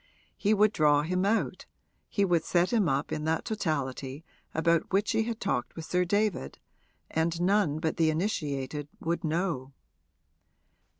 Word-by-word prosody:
He 215 +1 +2
would 210 +1 +4
draw 150 -1 +4
him 180 +4 0
out, 225 +2 0 0.4
he 200 - +2
would 170 -3 +2
set 175 +4 +1
him 210 -8 +3
up 135 +2 -1
in 150 - -2
that 160 0 0
totality 145 - -3 0.3
about 165 +1 +1
which 200 +2 +2
he 225 - +2
had 230 -1 -3
talked 125 -10 -2
with 165 - -6
Sir 180 +1 +1
David, 205 - 0 0.5
and 165 +1 0
none 180 -4 +2
but 160 0 -2
the 160 -1 +3
initiated 150 -5 -2
would 170 +1 -2
know. 155 -5 -1
165 Hz, 155 wpm, -29 LUFS, 150-195 Hz, 0.5 s, would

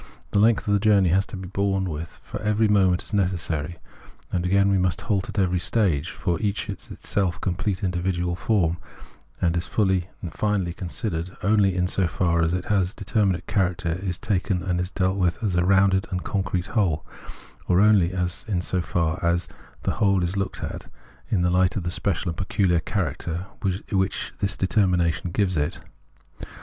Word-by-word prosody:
The 100 - +2
length 110 0 +3
of 100 - +2
the 100 - +4
journey 100 -3 +4
has 95 +3 +2
to - - -7
be 95 0 -7
borne 95 0 0
with, 80 0 -6
for 105 - -6
every 105 +1 +2
moment 95 -3 +3
is - - -7
necessary; 85 -4 -1 0.5
and 90 0 0
again 100 +1 +4
we 95 - +3
must 90 -1 0
halt 100 -4 -1
at - - -7
every 90 -2 +2
stage, 85 -6 +1
for 85 -3 -2
each 105 +1 -1
is 100 - -8
itself 95 -3 -1
a - - -15
complete 95 +2 -2
individual 90 -1 -1
form, 90 -5 +1 0.6
and 85 -1 +1
is 85 - -1
fully 95 -4 +1
and 85 - -5
finally 100 -5 0
considered 90 -1 -4
only 100 -2 +3
so 90 0 +1
far 85 -1 +1
as 80 0 +2
its 90 +1 0
determinate 100 -2 0
character 90 -3 0
is 90 -3 -2
taken 95 -2 -1
and 90 0 -1
dealt 95 0 +1
with 85 -2 +2
as 100 -5 0
a 90 - +3
rounded 95 0 +3
and 90 -2 -3
concrete 95 -3 -1
whole, 90 -9 +1 0.6
or 90 - +4
only 100 -4 +5 0.5
so 90 +1 -1
far 85 0 -1
as 85 +1 +1 0.4
the - - +1
whole 100 -3 +3
is 90 +2 -1
looked 100 0 -3
at - - -6 0.4
in 90 -5 +1
the 90 - +2
light 90 0 +3
of 100 - -2
the 90 - -2
special 90 0 -1
and 85 - -5
pecuhar 95 -4 +1
character 90 -1 -2 0.5
which 95 -1 -1
this 100 -1 -1
determination 90 -3 +1
gives 95 0 0
it. 75 +1 -1
95 Hz, 180 wpm, -24 LUFS, 85-100 Hz, 0.6 s, only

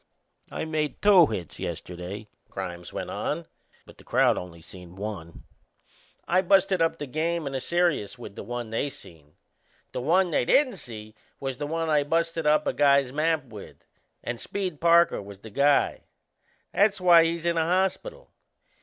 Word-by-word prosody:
"I - - -4
made 155 -2 -2
two 195 -6 +6
hits 90 - -6
yesterday," 90 +4 -6 0.2
Grimes 90 -3 -6
went - - -5
on, - - -3 0.4
"but - - -17
the - - -15
crowd - - +3
only 90 -2 -7
seen 90 +1 -13
one. 95 -5 -7 0.8
I 185 +2 +3
busted 190 -1 +3
up 165 0 +1
the 145 - -5
game 160 +4 -2
and 135 - -4
the 130 - -2
serious 170 - 0
with 120 -4 -10
the - - -7
one 120 -2 -5
they 125 +5 -1
seen. 80 - -16 0.6
The - - -4
one 175 +6 +2
they - - +2
didn't 255 - +3
see 110 -7 -8 0.3
was 135 -2 -4
the 145 - -3
one 165 +1 -2
I 150 -2 +3
busted 165 +1 -1
up 150 0 +3
a - - 0
guy's 140 -3 +3
map 155 -1 0
with 110 -5 -12 0.4
and 120 -1 -4
Speed 185 -7 -4
Parker 170 -4 +4
was 100 0 -11
the 110 +2 -12
guy. 140 +5 +2 0.7
That's 200 0 +3
why 175 -2 +7
he's 165 0 -2
in 170 -1 +1
a - - +3
hospital. 190 - -1
150 Hz, 170 wpm, -26 LUFS, 110-170 Hz, 0.8 s, why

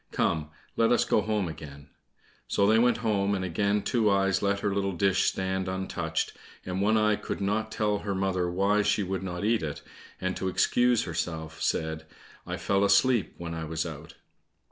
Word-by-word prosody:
Come, 75 -2 0 0.3
let 115 0 +3
us 120 - +3
go - - +2
home 105 -3 -1
again." 70 -3 -9 0.6
So 100 - +2
they 110 +2 +5
went 120 +1 +3
home, 100 -2 +1
and 95 -1 -2
again 100 +3 0
Two 115 -4 +2
eyes 95 -1 +2
let 100 0 0
her 100 - 0
little 100 -1 -1
dish 95 +1 +2
stand 95 0 -1
untouched, 95 0 -2 0.3
and 90 +1 -2
One 110 +2 +3
eye 105 -1 +3
could - - -5
not 105 +2 -1
tell 105 -2 0
her 100 -1 -3
mother 95 -2 0
why 100 +4 +2
she 105 0 +1
would 95 -1 -3
not 90 0 -4
eat 115 0 +2
it, 75 -3 -5 0.4
and 95 0 -2
to 95 - -2
excuse 120 +5 +2
herself 80 -1 -4
said, 80 0 -1 0.4
"I - - -3
fell 100 0 +1
asleep 100 +3 +3
when 85 -1 -5
I 80 -1 -4
was 80 +1 -2
out." 80 -1 -8
95 Hz, 190 wpm, -28 LUFS, 90-105 Hz, 0.6 s, they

